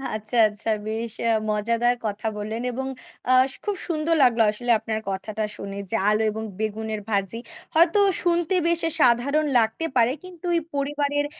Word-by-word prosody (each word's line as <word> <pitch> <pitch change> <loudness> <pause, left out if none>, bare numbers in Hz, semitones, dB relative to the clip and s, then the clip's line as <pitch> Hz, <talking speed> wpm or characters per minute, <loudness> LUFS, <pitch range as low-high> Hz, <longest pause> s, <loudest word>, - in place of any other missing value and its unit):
আচ্ছা, 215 +2 -3
আচ্ছা। 210 +2 -4 0.2
বেশ 225 +1 -3 0.2
আ - - +4 0.2
মজাদার 230 +3 +1
কথা 210 +1 -3
বললেন 215 +2 -4
এবং 265 +2 -4 0.4
আ - - +6 0.3
খুব 415 -1 -1
সুন্দর 330 0 0
লাগলো 240 -2 +4
আসলে 240 +3 -2
আপনার 220 0 -3
কথাটা 205 +3 -3
শুনে। 200 0 -7
যে - - +1
আলু 215 +1 +2
এবং 220 +1 -5 0.2
বেগুনের 220 0 -3
ভাজি। 200 +1 0 0.4
হয়তো 335 +5 +5 0.2
শুনতে 345 +1 +1
বেশ 340 0 +1 0.2
সাধারণ 260 +6 +4
লাগতে 225 +8 0
পারে। 240 -1 +4
কিন্তু 365 -1 -11
ওই 335 - +2
পরিবারের 290 +1 0
235 Hz, 160 wpm, -24 LUFS, 215-295 Hz, 0.4 s, আ